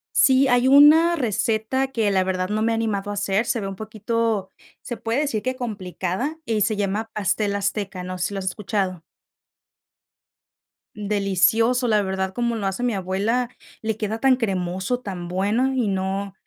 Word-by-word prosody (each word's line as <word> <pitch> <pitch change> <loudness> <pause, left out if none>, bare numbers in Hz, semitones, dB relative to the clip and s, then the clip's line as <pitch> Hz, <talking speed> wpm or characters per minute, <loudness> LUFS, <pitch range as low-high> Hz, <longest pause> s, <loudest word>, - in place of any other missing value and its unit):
Sí, 265 0 +5
hay 245 0 +3
una 300 +5 +7
receta 230 - 0
que 225 -5 +1
la 190 -1 +2
verdad 185 0 -2
no 215 +1 -1
me 230 - +2
he - - +1
animado 205 -3 -2
a - - -3
hacer, 200 +2 0
se 235 - 0
ve 195 - -3
un 195 - -5
poquito, 220 -1 -2 0.3
se 240 - -6
puede 230 +3 -1
decir 280 -8 -1
que 255 +2 -1
complicada, 210 - -4
y 220 -2 0
se 215 +2 +1
llama 205 +2 -2
Pastel 205 0 0
Azteca, 200 -2 -2
no 185 0 -5
sé 180 - 0
si - - -8
lo 195 - -3
has 190 - -6
escuchado. 190 -2 -2 1.9
Delicioso, 210 +4 +2
la 215 -2 +3
verdad, 190 -1 -2
como 240 0 -1
lo 210 -3 -3
hace 195 +4 -2
mi 245 -3 0
abuela, 200 +6 -1 0.3
le 220 -1 -1
queda 220 +1 -3
tan 265 0 +4
cremoso, 190 0 -2
tan 185 -7 -6
bueno, 205 +9 +1
y 250 -4 0
no, 195 +1 -2
210 Hz, 180 wpm, -23 LUFS, 195-235 Hz, 1.9 s, una